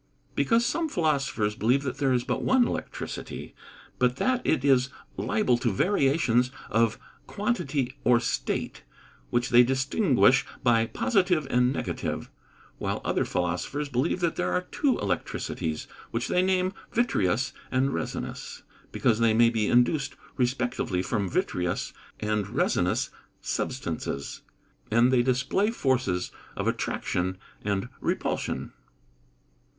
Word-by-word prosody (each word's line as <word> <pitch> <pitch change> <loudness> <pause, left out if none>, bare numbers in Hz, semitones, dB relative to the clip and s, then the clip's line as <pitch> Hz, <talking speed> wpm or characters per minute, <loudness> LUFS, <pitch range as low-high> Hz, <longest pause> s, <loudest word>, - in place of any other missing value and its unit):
_ - - -32
Because 235 0 +3
some 330 +3 0
philosophers 135 - 0
believe 125 +6 +2
that 130 -1 -3
there 135 -2 +2
is 125 -1 +2
but - - -2
one 260 -2 +4
electricity, - - -5 0.5
but 125 0 +3
that 255 - +1
it 145 -4 +1
is 130 -2 +4 0.3
liable 125 - +1
to 120 - +1
variations 135 - +2 0.2
of 115 0 +2 0.3
quantity 155 - -1
or 120 -1 +5
state, - - -2 0.5
which 120 +1 0
they 120 0 +8
distinguish 135 - +3 0.2
by 115 -2 +4
positive 180 - +1
and 125 +1 +3
negative; 135 - -3 0.5
while - - -2
other - - +1
philosophers 90 - -2
believe 135 +7 0
that 170 -2 0
there 180 - 0
are 180 - +1
two 280 -4 +2
electricities, 80 -1 -2 0.2
which 115 +1 -2
they 180 - +3
name 185 0 +1 0.2
vitreous 130 - +1 0.2
and 135 +1 +1
resinous, - - -5 0.3
because 115 -2 +2
they 115 -1 +4
may 115 0 +5
be 110 -3 0
induced 135 +4 +2 0.2
respectively 125 -7 0
from 100 -4 -1
vitreous 90 0 -1 0.3
and 105 -1 -1
resinous - - +1 0.3
substances, 80 - -3 0.5
and 120 +4 +4
they 125 - +5
display 130 - +1
forces 130 - 0 0.2
of - - -2
attraction 90 +1 -1 0.3
and 100 -1 -1
repulsion. - - -2
125 Hz, 125 wpm, -27 LUFS, 115-155 Hz, 0.5 s, they